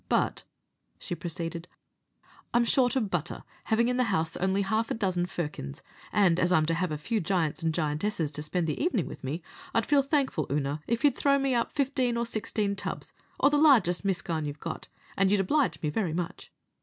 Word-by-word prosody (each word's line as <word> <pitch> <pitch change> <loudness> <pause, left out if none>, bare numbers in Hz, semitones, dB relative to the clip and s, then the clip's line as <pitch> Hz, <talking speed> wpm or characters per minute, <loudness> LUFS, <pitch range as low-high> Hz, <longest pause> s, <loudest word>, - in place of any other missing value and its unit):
But," - - +1 0.5
she 180 - -6
proceeded, 170 0 -5 0.9
"I'm 240 0 +5
short 250 +1 +3
of 220 -7 0
butter, 175 0 -2 0.2
having 230 +2 +2
in 250 0 0
the 255 - +3
house 165 -6 0
only 190 +2 +1
half 220 +4 0
a - - -1
dozen 185 -5 0
firkins, 150 - -5 0.3
and 180 -4 +4
as 180 - +2
I'm 155 -4 +4
to 165 - +1
have 175 0 -1
a 150 - -2
few 220 +9 -1
giants 170 -3 0
and 165 -1 +1
giantesses 155 +1 -1
to 150 - -4
spend 165 +3 -1
the 155 - -2
evenin' 250 - +1
with - - -9
me, 150 +6 -3 0.3
I'd - - +3
feel 290 -1 +4
thankful, 275 - 0
Oonagh, 145 +1 -1
if 235 0 -1
you'd 285 -4 +5
throw 280 -1 +3
me 270 -1 +1
up 235 -1 0
fifteen 265 -4 +1
or 235 - 0
sixteen 210 -2 -1
tubs, 195 - -5 0.3
or 280 - +5
the 295 - +3
largest 235 - +5
miscaun 175 -5 -1
you 145 - -3
have 150 - -24
got, 165 0 -6 0.3
and 195 0 +3
you'll 205 -1 +4
oblige 280 +8 +1
me 150 - 0
very 175 -2 -1
much." 175 0 -4
190 Hz, 205 wpm, -28 LUFS, 165-235 Hz, 0.9 s, I'm